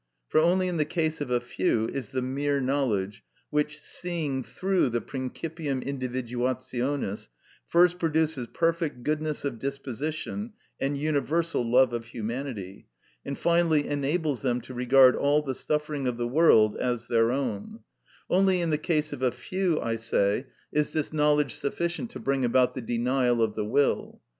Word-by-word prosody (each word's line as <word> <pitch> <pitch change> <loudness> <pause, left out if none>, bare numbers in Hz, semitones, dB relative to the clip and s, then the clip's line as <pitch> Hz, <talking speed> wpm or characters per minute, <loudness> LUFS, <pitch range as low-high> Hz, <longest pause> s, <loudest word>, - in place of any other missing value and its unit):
For - - +4
only 180 +3 +3
in 180 -2 -2
the - - +2
case 160 0 -1
of 145 - -3
a 125 -1 +2
few 115 -2 0
is 130 +2 -4
the 130 -1 -2
mere 140 +2 0
knowledge 115 -7 -1 0.3
which, 150 0 0
seeing 155 -6 -3
through 180 +7 0
the 120 0 0
principium 140 +2 -4
individuationis, 130 -2 -2 0.4
first 175 +1 +4
produces 160 -6 0
perfect 165 -5 -1
goodness 155 0 -1
of 125 -5 -3
disposition 140 - -4 0.3
and 140 +1 -1
universal 155 +1 0
love 120 +1 +4
of 115 -1 -3
humanity, 115 -4 -5 0.4
and 140 - -5
finally 170 -3 +2
enables 145 0 -1
them 125 -2 0
to 130 - -10
regard 125 +1 +6
all 145 +1 +2
the 135 -2 -2
suffering 150 0 -2
of 125 -1 -1
the 120 0 -1
world 120 -6 +5
as 120 -2 -1
their 115 0 +3
own; 135 - -3 0.5
only 190 0 +3
in 170 -2 0
the 150 - +1
case 155 -2 0
of - - -7
a 130 - +3
few, 175 +7 -1
I 115 -1 -1
say, 115 +2 0 0.2
is 150 0 0
this 155 0 -1
knowledge 150 -4 +2
sufficient 170 - -2
to - - -8
bring 135 -1 0
about 125 +1 +3
the 130 - -5
denial 120 +1 +1
of 110 -2 +2
the 105 -1 -2
will. 140 +6 +1
140 Hz, 160 wpm, -27 LUFS, 120-155 Hz, 0.5 s, regard